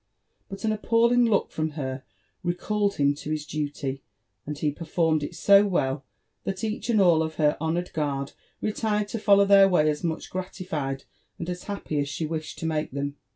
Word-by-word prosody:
But 195 Hz, +2 st, -8 dB
an 220 Hz, -, +2 dB
appealing 235 Hz, +3 st, +3 dB
look 215 Hz, -4 st, +1 dB
from 155 Hz, -1 st, -2 dB
her 130 Hz, -2 st, -4 dB, 0.4 s
re 175 Hz, 0 st, -1 dB
called 205 Hz, +2 st, 0 dB
him 140 Hz, 0 st, +3 dB
to 145 Hz, +1 st, -8 dB
his 155 Hz, -1 st, -2 dB
duty; 145 Hz, -3 st, -3 dB, 0.5 s
and 150 Hz, 0 st, -4 dB
he 150 Hz, 0 st, 0 dB
performed 160 Hz, 0 st, 0 dB
it 150 Hz, +4 st, -5 dB
so 200 Hz, +2 st, +6 dB
well, 135 Hz, -7 st, 0 dB, 0.4 s
that 195 Hz, +2 st, -4 dB
each 220 Hz, +1 st, -3 dB
and 220 Hz, -3 st, +4 dB
all 175 Hz, -4 st, +5 dB
of 160 Hz, 0 st, -3 dB
her 150 Hz, -2 st, +3 dB
honoured 170 Hz, +2 st, -1 dB
guard 140 Hz, -3 st, -2 dB, 0.3 s
retired 210 Hz, -1 st, 0 dB
to 225 Hz, -, -3 dB
follow 200 Hz, -1 st, +5 dB
their 195 Hz, -1 st, +7 dB
way 155 Hz, -5 st, +3 dB
as 150 Hz, +1 st, -1 dB
much 165 Hz, -2 st, -3 dB
gratified 160 Hz, -7 st, -4 dB, 0.3 s
and 170 Hz, -, -5 dB
as 180 Hz, 0 st, -7 dB
happy 200 Hz, -7 st, -3 dB
as 140 Hz, 0 st, -1 dB
she 155 Hz, +2 st, -3 dB
wished 155 Hz, 0 st, -4 dB
to -, -, -5 dB
make 155 Hz, -1 st, -1 dB
them. 140 Hz, +1 st, -4 dB
160 Hz, 195 wpm, -26 LUFS, 150-200 Hz, 0.5 s, their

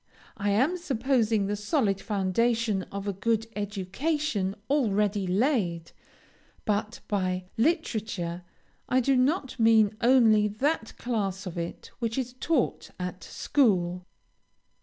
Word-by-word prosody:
I 205 Hz, 0 st, -1 dB
am 260 Hz, -, +2 dB
supposing 235 Hz, -, +1 dB
the 205 Hz, +1 st, -1 dB
solid 210 Hz, -, 0 dB
foundation 215 Hz, +1 st, +1 dB
of 200 Hz, 0 st, -5 dB
a 200 Hz, -, 0 dB
good 225 Hz, +3 st, 0 dB
education 205 Hz, -, -2 dB
already 210 Hz, -7 st, +1 dB
laid, 185 Hz, -, 0 dB, 0.7 s
but 215 Hz, +2 st, -1 dB
by 185 Hz, -2 st, -1 dB
literature, 220 Hz, -, -1 dB, 0.5 s
I 255 Hz, -, +4 dB
do 270 Hz, +2 st, +2 dB
not 260 Hz, 0 st, +1 dB
mean 220 Hz, -2 st, +5 dB
only 230 Hz, -4 st, +5 dB
that 230 Hz, +4 st, -1 dB
class 200 Hz, -5 st, -2 dB
of 180 Hz, -, -6 dB
it 170 Hz, -1 st, -6 dB
which 230 Hz, -1 st, -2 dB
is 250 Hz, -2 st, -2 dB
taught 310 Hz, -7 st, 0 dB
at 180 Hz, 0 st, -5 dB
school. 180 Hz, -9 st, +1 dB
215 Hz, 115 wpm, -27 LUFS, 195-250 Hz, 0.7 s, mean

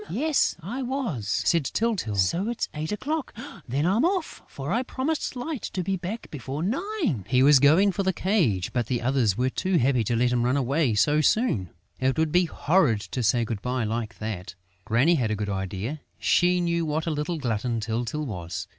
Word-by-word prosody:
"Yes, 305 Hz, +3 st, +1 dB
I 240 Hz, +10 st, -4 dB
was," 245 Hz, -, -3 dB
said 165 Hz, -, +2 dB
Tyltyl. 200 Hz, -, -1 dB
"So 170 Hz, -, +1 dB
it's 235 Hz, -, -2 dB
eight 155 Hz, +3 st, -4 dB
o'clock?... 290 Hz, +7 st, -3 dB, 0.3 s
Then 140 Hz, +5 st, 0 dB
I'm 200 Hz, +8 st, +2 dB
off, 360 Hz, -1 st, -1 dB
for 140 Hz, +3 st, -6 dB
I 235 Hz, -, +2 dB
promised 265 Hz, +3 st, -2 dB
Light 255 Hz, +2 st, -4 dB
to 185 Hz, -, -2 dB
be 195 Hz, +2 st, -1 dB
back 190 Hz, +6 st, -6 dB
before 140 Hz, +2 st, -5 dB
nine...." 275 Hz, -, -1 dB
He 125 Hz, +1 st, +3 dB
was 145 Hz, 0 st, +7 dB
going 160 Hz, +9 st, +5 dB
for 195 Hz, -, -2 dB
the 190 Hz, -1 st, +1 dB
cage, 165 Hz, -, 0 dB
but 120 Hz, -3 st, 0 dB
the 125 Hz, -1 st, 0 dB
others 120 Hz, -6 st, +2 dB
were 130 Hz, +1 st, +1 dB
too 185 Hz, +4 st, 0 dB
happy 125 Hz, -3 st, +2 dB
to 120 Hz, -, 0 dB
let 120 Hz, +1 st, +2 dB
him 125 Hz, -1 st, +1 dB
run 125 Hz, +3 st, +2 dB
away 135 Hz, -2 st, +1 dB
so 150 Hz, +8 st, +3 dB
soon: 150 Hz, -, +1 dB, 0.3 s
it 130 Hz, +2 st, +1 dB
would 160 Hz, -1 st, +1 dB
be 180 Hz, +2 st, +4 dB
horrid 150 Hz, -, +2 dB
to 130 Hz, -, -2 dB
say 115 Hz, +1 st, +2 dB
good 110 Hz, -3 st, -4 dB
bye 125 Hz, -1 st, -1 dB
like 115 Hz, +1 st, -3 dB
that! 105 Hz, -5 st, -5 dB, 0.3 s
Granny 130 Hz, +10 st, +3 dB
had 125 Hz, -9 st, +1 dB
a 110 Hz, -, 0 dB
good 105 Hz, 0 st, -3 dB
idea: 100 Hz, +9 st, -4 dB, 0.2 s
she 180 Hz, 0 st, +3 dB
knew 170 Hz, -1 st, 0 dB
what 155 Hz, 0 st, -1 dB
a 165 Hz, -, -1 dB
little 155 Hz, +3 st, -2 dB
glutton 120 Hz, -3 st, -1 dB
Tyltyl 115 Hz, +6 st, -2 dB
was. 90 Hz, -, -5 dB
145 Hz, 200 wpm, -26 LUFS, 115-190 Hz, 0.3 s, was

